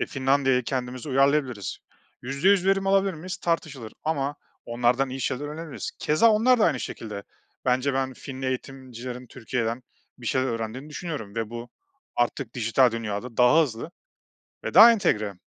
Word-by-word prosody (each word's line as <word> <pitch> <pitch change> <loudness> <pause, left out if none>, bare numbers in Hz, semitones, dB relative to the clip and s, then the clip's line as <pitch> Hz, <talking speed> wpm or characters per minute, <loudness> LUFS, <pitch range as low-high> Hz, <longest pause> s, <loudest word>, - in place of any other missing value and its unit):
E, - - 0
Finlandiya'ya 135 -1 +2
kendimize 125 +2 -4
uyarlayabiliriz. 135 -6 +1 0.4
%100 180 +9 +2
verim 195 0 +2
alabilir 195 -1 +3
miyiz? 180 +4 -6
Tartışılır 145 -9 -3
ama 145 -2 -1 0.3
onlardan 120 +3 +1
iyi 135 - -5
şeyler 130 +2 -2
öğrenebiliriz. 155 +1 -6
Keza 220 +10 +4
onlar 235 +4 +4
da 215 - +4
aynı 140 -7 +1
şekilde. 105 -3 -6 0.4
Bence 130 +2 +1
ben 130 0 -1
Finli 130 +1 -7
eğitimcilerin 130 -1 -6
Türkiye'den 115 +1 -3 0.4
bir 120 - -9
şeyler 130 +3 +1
öğrendiğini 115 +5 -4
düşünüyorum 150 - -6
ve 115 -1 -3
bu 120 0 -7 0.5
artık 120 -2 -1
dijital 120 +1 +3
dünyada 115 +1 -4
daha 125 +6 +6
hızlı 125 +1 -4 0.7
ve - - -4
daha 235 +2 +10
entegre. 105 - +1
130 Hz, 145 wpm, -25 LUFS, 120-150 Hz, 0.7 s, daha